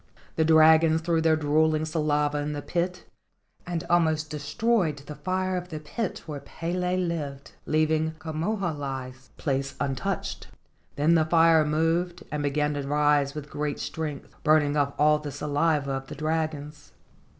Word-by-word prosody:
The 160 - +2
dragons 160 0 +5
threw 165 0 +1
their 160 -1 +3
drool¬ 155 +1 +2
ing 155 - -2
saliva 150 -2 0
in 150 +1 -2
the 145 -1 -5
pit, 180 +1 -2 0.6
and 175 -2 -2
almost 160 -3 +2
destroyed 155 +3 0
the 150 - -7
fire 185 +5 -2
of 180 0 -4
the 155 -3 -5
pit 185 +7 -4
where 150 -3 -5
Pele 180 +4 -2
lived, 155 -6 -3 0.2
leaving 155 0 +1
Ka 160 0 -7
moho 195 +7 -1
alii's 130 -3 -6
place 135 -1 -2
untouched. 160 +7 -3 0.5
Then 150 +4 +3
the 160 -2 +4
fire 165 -1 +5
moved 165 +4 0
and 150 -1 -2
began 150 +1 0
to 145 - -2
rise 145 0 +2
with 150 -1 -7
great 145 -1 -3
strength, 155 -3 -5
burning 150 -2 +3
off 140 -1 +1
all 150 0 +4
the 150 -1 -6
saliva 145 0 0
of 135 0 -4
the 150 - -8
dragons. 155 -1 -3
155 Hz, 160 wpm, -26 LUFS, 145-165 Hz, 0.6 s, dragons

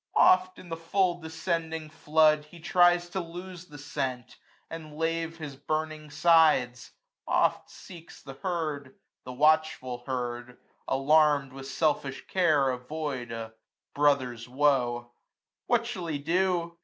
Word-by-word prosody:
Oft 185 0 +4
in 180 - -12
the 165 - -4
full 175 +1 0
descending 160 -1 -3
flood 155 -1 +3
he 170 +3 -15
tries 175 +1 +3
445 - - -22
To 190 - -2 0.3
lose 180 -1 -11
the 150 - -12
scent, 130 -4 -4 0.3
and 155 -2 -9
lave 165 0 -2
his 150 -4 -7
burning 155 +1 -4
sides: 145 -6 +3 0.4
Oft - - +1
seeks 170 -3 -13
the 135 - -9
herd; 150 -4 -4 0.3
the 125 - -6
watchful 150 -4 +1
herd, 125 -1 -4 0.3
alarmM, 145 0 +3
With 135 0 -9
selfish 140 -2 -1
care 155 -8 +2
avoid 130 -1 -5
a 115 -1 -6 0.4
brother's 130 -5 +1
woe. 125 -3 +1 0.6
What 235 -1 +2
shall 195 -8 -5
he 155 -3 -2
do 170 +2 0
155 Hz, 130 wpm, -28 LUFS, 135-165 Hz, 0.6 s, Oft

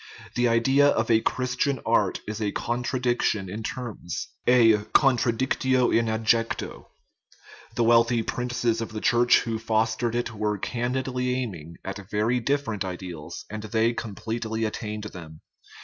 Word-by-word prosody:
The 120 0 +2
idea 135 +5 +4
of 115 -4 +1
a 110 0 +5
Christian 130 +3 0
art 105 -4 +2
is 110 +1 -4
a 105 -2 0
contradiction 120 -4 -1
in 105 +5 -5
terms 110 -6 -5 0.2
a 115 -3 +6 0.2
contradictio 130 0 +3
in 115 0 +2
adjecto. 110 +1 0 0.9
The 120 - +2
wealthy 115 0 +4
princes 120 -1 -1
of 115 - -5
the 110 - -3
Church 120 0 +4
who 115 -2 -3
fostered 115 +1 0
it 120 0 -1
were 105 -1 -1
candidly 125 +3 -2
aiming 85 -11 -5
at 95 0 -6
very 110 +4 +1
different 120 -5 -1
ideals, 90 -4 -7
and 110 +2 -6
they 110 +2 +1
completely 110 0 -3
attained 105 -1 -4
them. 80 -7 -10
115 Hz, 135 wpm, -26 LUFS, 110-125 Hz, 0.9 s, a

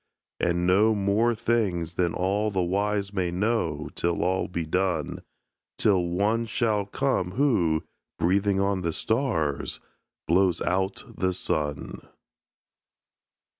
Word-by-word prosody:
And 85 0 +1
know 105 +5 +4
more 105 +4 +2
things 95 -8 0
than 85 -1 0
all 100 +4 0
the 95 -3 0
wise 100 +2 -1
may 95 -3 0
know 90 -5 -1
Till 85 0 0
all 95 +1 0
be 85 -3 -3
done; 90 -2 -1 0.6
Till 95 -4 +3
One 105 +7 0
shall 110 -3 0
come 100 -7 -1
who, 95 - +2 0.3
breathing 95 +2 +2
on 100 -1 +1
the 85 -2 -1
stars, 105 - -1 0.5
Blows 90 +1 +3
out 95 +1 -1
the 95 0 -1
sun. 75 -4 -2
95 Hz, 120 wpm, -26 LUFS, 85-105 Hz, 0.6 s, know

